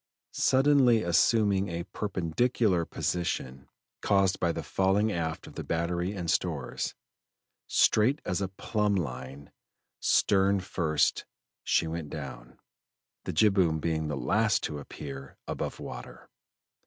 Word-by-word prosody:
Suddenly 130 Hz, -4 st, +4 dB
assuming 100 Hz, +3 st, +3 dB
a 85 Hz, 0 st, -3 dB
perpendicular 95 Hz, +1 st, 0 dB
position, 65 Hz, -8 st, -3 dB, 0.3 s
caused 95 Hz, -1 st, +2 dB
by 85 Hz, -2 st, +1 dB
the -, -, -5 dB
falling 95 Hz, +3 st, +1 dB
aft 80 Hz, -3 st, -3 dB
of -, -, -12 dB
the -, -, -5 dB
battery 85 Hz, +3 st, -1 dB
and 90 Hz, -4 st, -5 dB
stores, -, -, -1 dB, 0.7 s
straight 130 Hz, +8 st, +3 dB
as 90 Hz, +2 st, -1 dB
a 95 Hz, -, 0 dB
plumb 105 Hz, +2 st, -1 dB
line, 70 Hz, -3 st, -5 dB, 0.5 s
stern 100 Hz, 0 st, +3 dB
first, 80 Hz, -5 st, 0 dB, 0.4 s
she -, -, +2 dB
went 80 Hz, -2 st, -4 dB
down, 65 Hz, -5 st, -8 dB, 0.7 s
the -, -, -2 dB
jibboom 90 Hz, -3 st, +3 dB
being 80 Hz, -1 st, -1 dB
the 75 Hz, -2 st, -3 dB
last 110 Hz, +5 st, +1 dB
to 75 Hz, -, -3 dB
appear 70 Hz, -1 st, -9 dB
above -, -, -4 dB
water. -, -, -9 dB
90 Hz, 120 wpm, -29 LUFS, 80-100 Hz, 0.7 s, Suddenly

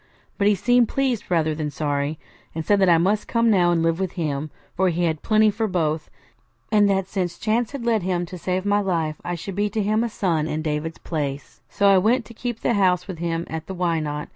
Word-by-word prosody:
But 200 Hz, -, +3 dB
he 210 Hz, -, +4 dB
seemed 240 Hz, +4 st, +3 dB
pleased 265 Hz, -5 st, -1 dB
rather 160 Hz, -3 st, +1 dB
than 150 Hz, -1 st, -3 dB
sorry, 145 Hz, +1 st, -2 dB, 0.4 s
and 160 Hz, -1 st, -3 dB
said 205 Hz, -1 st, +3 dB
that 190 Hz, -, +5 dB
I 170 Hz, -, +6 dB
must 200 Hz, +5 st, +1 dB
come 230 Hz, -1 st, +2 dB
now 180 Hz, -4 st, +4 dB
and 165 Hz, -1 st, +1 dB
live 165 Hz, +1 st, +1 dB
with 190 Hz, -2 st, -2 dB
him, 155 Hz, -3 st, -2 dB, 0.3 s
for 190 Hz, +1 st, +2 dB
he 175 Hz, +1 st, -1 dB
had 160 Hz, -3 st, 0 dB
plenty 215 Hz, -1 st, +3 dB
for 220 Hz, +2 st, -1 dB
both; 160 Hz, -5 st, -1 dB, 0.6 s
and 205 Hz, -2 st, +4 dB
that 195 Hz, -1 st, +1 dB
since 185 Hz, -3 st, -3 dB
chance 225 Hz, +2 st, 0 dB
had 275 Hz, -4 st, -6 dB
led 225 Hz, -3 st, +2 dB
him 175 Hz, -1 st, -1 dB
to 180 Hz, +2 st, -8 dB
save 185 Hz, +2 st, -2 dB
my 205 Hz, 0 st, +2 dB
life, 165 Hz, -6 st, -1 dB
I 175 Hz, -, -3 dB
should 190 Hz, +4 st, -6 dB
be 205 Hz, +2 st, 0 dB
to 215 Hz, 0 st, -1 dB
him 215 Hz, +3 st, +1 dB
a 235 Hz, -, -1 dB
son 165 Hz, -7 st, 0 dB
in 155 Hz, 0 st, -3 dB
David's 155 Hz, +1 st, -3 dB
place. 145 Hz, -4 st, -5 dB
So 200 Hz, -, +2 dB
I 195 Hz, -1 st, +6 dB
went 230 Hz, +6 st, +2 dB
to 235 Hz, -, -12 dB
keep 240 Hz, 0 st, -5 dB
house 190 Hz, -5 st, +2 dB
with 185 Hz, -4 st, -7 dB
him 170 Hz, 0 st, -2 dB
at 160 Hz, 0 st, -6 dB
the 190 Hz, -, -5 dB
Why 170 Hz, -2 st, 0 dB
Not? 150 Hz, -1 st, -4 dB
180 Hz, 240 wpm, -23 LUFS, 160-210 Hz, 0.6 s, I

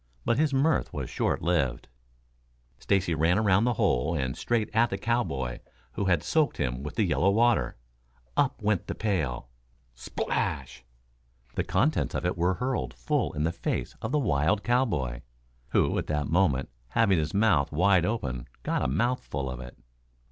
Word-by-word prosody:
But 115 Hz, -, +2 dB
his 155 Hz, -2 st, +3 dB
mirth 140 Hz, +3 st, +2 dB
was -, -, -5 dB
short -, -, -1 dB
lived. 80 Hz, -7 st, 0 dB, 0.9 s
Stacy 95 Hz, -4 st, +1 dB
ran 80 Hz, +3 st, +2 dB
around 105 Hz, 0 st, +3 dB
the 125 Hz, -, +2 dB
hole 80 Hz, -1 st, +1 dB
and 65 Hz, -4 st, -1 dB
straight 115 Hz, -3 st, -1 dB
at 115 Hz, +2 st, +3 dB
the 95 Hz, -, -2 dB
cowboy 70 Hz, -, -1 dB, 0.3 s
who 100 Hz, -, -2 dB
had 90 Hz, -5 st, +2 dB
soaked 155 Hz, -3 st, +1 dB
him 60 Hz, -2 st, -2 dB
with 75 Hz, +2 st, -6 dB
the 110 Hz, -, +2 dB
yellow 90 Hz, +1 st, +2 dB
water. 110 Hz, -, +2 dB, 0.6 s
Up 140 Hz, -2 st, +1 dB
went 100 Hz, -2 st, +1 dB
the -, -, -3 dB
pail. 80 Hz, -, -2 dB, 0.4 s
Splash! -, -, -3 dB, 0.7 s
The -, -, -1 dB
contents 155 Hz, +3 st, +1 dB
of -, -, -2 dB
it 90 Hz, -, 0 dB
were 90 Hz, +1 st, +1 dB
hurled 125 Hz, +3 st, -2 dB
full 150 Hz, -4 st, 0 dB
in 75 Hz, 0 st, -2 dB
the 80 Hz, -, +1 dB
face 60 Hz, -, -3 dB
of 110 Hz, -, -3 dB
the 150 Hz, -, +2 dB
wild 100 Hz, -, +1 dB
cowboy, 105 Hz, -, 0 dB, 0.5 s
who -, -, +2 dB
at -, -, -4 dB
that 75 Hz, -1 st, -1 dB
moment, 80 Hz, -7 st, +2 dB, 0.2 s
having 100 Hz, -, +3 dB
his 75 Hz, +4 st, -2 dB
mouth 100 Hz, -10 st, +3 dB
wide 90 Hz, +3 st, +4 dB
open, 70 Hz, -, -2 dB, 0.2 s
got -, -, 0 dB
a -, -, +1 dB
mouthful 70 Hz, -, -1 dB
of 65 Hz, -, -6 dB
it. 60 Hz, -1 st, -10 dB
90 Hz, 170 wpm, -28 LUFS, 70-115 Hz, 0.9 s, wide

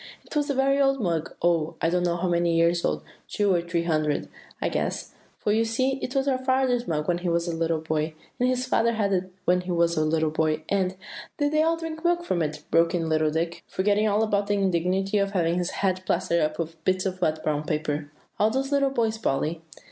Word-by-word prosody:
It -, -, -10 dB
was 295 Hz, 0 st, +1 dB
a 280 Hz, -, 0 dB
very 275 Hz, +1 st, +3 dB
old 270 Hz, 0 st, +3 dB
mug, 165 Hz, -6 st, -2 dB
oh! 170 Hz, -2 st, +2 dB
I 165 Hz, -, +1 dB
don't 180 Hz, 0 st, +1 dB
know 175 Hz, -1 st, 0 dB
how 180 Hz, +2 st, -1 dB
many 170 Hz, -1 st, +2 dB
years 170 Hz, +1 st, +3 dB
old, 75 Hz, 0 st, -1 dB, 0.2 s
two 205 Hz, -2 st, +1 dB
or 175 Hz, -, +2 dB
three 170 Hz, 0 st, -1 dB
hundred, 155 Hz, -3 st, 0 dB, 0.3 s
I -, -, 0 dB
guess; -, -, -2 dB, 0.2 s
for 210 Hz, -, -1 dB
you 220 Hz, +2 st, +3 dB
see 255 Hz, +4 st, 0 dB
it 255 Hz, -, -4 dB
was 270 Hz, 0 st, +1 dB
our 260 Hz, -2 st, +2 dB
father's 260 Hz, -2 st, +1 dB
mug 150 Hz, -2 st, -1 dB
when 175 Hz, -1 st, +1 dB
he 175 Hz, 0 st, -2 dB
was 170 Hz, +1 st, 0 dB
a 170 Hz, -, -2 dB
little 165 Hz, -1 st, 0 dB
boy, 155 Hz, 0 st, -2 dB, 0.2 s
and 250 Hz, +1 st, +3 dB
his 255 Hz, 0 st, 0 dB
father 235 Hz, -2 st, +2 dB
had 205 Hz, -3 st, 0 dB
it 185 Hz, 0 st, -1 dB
when 180 Hz, 0 st, +3 dB
he 180 Hz, 0 st, -5 dB
was 170 Hz, -1 st, +2 dB
a 155 Hz, -, +3 dB
little 155 Hz, 0 st, +1 dB
boy, 155 Hz, 0 st, 0 dB
and" 190 Hz, -2 st, +1 dB, 0.4 s
"Did 290 Hz, -1 st, +1 dB
they 310 Hz, 0 st, +3 dB
all 330 Hz, +1 st, +2 dB
drink 325 Hz, -1 st, -6 dB
their 350 Hz, +1 st, +3 dB
milk 345 Hz, 0 st, -11 dB
from 175 Hz, -, 0 dB
it?" 150 Hz, -1 st, -3 dB
broke 165 Hz, +1 st, +3 dB
in 165 Hz, -2 st, -1 dB
little 155 Hz, -1 st, +2 dB
Dick, 165 Hz, +2 st, -2 dB
forgetting 205 Hz, +3 st, +1 dB
all 210 Hz, +1 st, +2 dB
about 205 Hz, -2 st, 0 dB
the 205 Hz, -, +1 dB
indignity 190 Hz, +1 st, +1 dB
of 200 Hz, 0 st, 0 dB
having 170 Hz, -2 st, +1 dB
his 180 Hz, 0 st, -1 dB, 0.2 s
head 185 Hz, -1 st, +1 dB
plastered 170 Hz, -1 st, +1 dB
up 155 Hz, 0 st, 0 dB
with 165 Hz, -1 st, -5 dB
bits 185 Hz, 0 st, +1 dB
of 185 Hz, -1 st, -3 dB
wet 155 Hz, -2 st, 0 dB
brown 150 Hz, -1 st, 0 dB
paper; 150 Hz, -1 st, -2 dB, 0.3 s
"all 210 Hz, -, +4 dB
those 270 Hz, +4 st, -1 dB
little 280 Hz, -1 st, +3 dB
boys, 225 Hz, -4 st, 0 dB
Polly?" 160 Hz, -3 st, -1 dB
180 Hz, 240 wpm, -26 LUFS, 165-225 Hz, 0.4 s, all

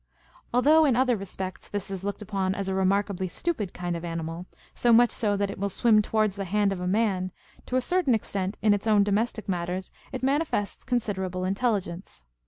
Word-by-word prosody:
Although, 295 Hz, +6 st, +5 dB
in 265 Hz, -5 st, +3 dB
other 255 Hz, 0 st, +3 dB
respects, 190 Hz, -2 st, -6 dB
this 205 Hz, -1 st, -4 dB
is 190 Hz, -1 st, -5 dB
looked 205 Hz, +1 st, -4 dB
upon 190 Hz, -2 st, -1 dB
as 200 Hz, -1 st, -3 dB
a 190 Hz, -, -1 dB
remarkably 190 Hz, 0 st, +1 dB
stupid 210 Hz, -, -2 dB
kind 175 Hz, -1 st, -3 dB
of 170 Hz, -, -5 dB
animal, 165 Hz, +1 st, -4 dB, 0.3 s
so 240 Hz, -, +2 dB
much 235 Hz, +1 st, +6 dB
so, 205 Hz, -2 st, 0 dB
that 200 Hz, 0 st, 0 dB
it -, -, -9 dB
will 200 Hz, +1 st, 0 dB
swim 215 Hz, +2 st, +4 dB
towards 215 Hz, -2 st, 0 dB
the 195 Hz, -, -3 dB
hand 205 Hz, +2 st, +1 dB
of 185 Hz, -, -6 dB
a 180 Hz, -, -2 dB
man, 190 Hz, -2 st, +1 dB, 0.4 s
to 250 Hz, -, -2 dB
a 255 Hz, -, +3 dB
certain 310 Hz, -3 st, +2 dB
extent 195 Hz, -2 st, -3 dB
in 215 Hz, -1 st, +5 dB
its 205 Hz, +2 st, -2 dB
own 210 Hz, -2 st, +5 dB
domestic 215 Hz, +2 st, -1 dB
matters 180 Hz, 0 st, -3 dB, 0.2 s
it 260 Hz, -, -5 dB
manifests 275 Hz, -7 st, 0 dB
considerable 190 Hz, -7 st, -2 dB
intelligence. 190 Hz, -, -2 dB
200 Hz, 195 wpm, -27 LUFS, 185-225 Hz, 0.4 s, much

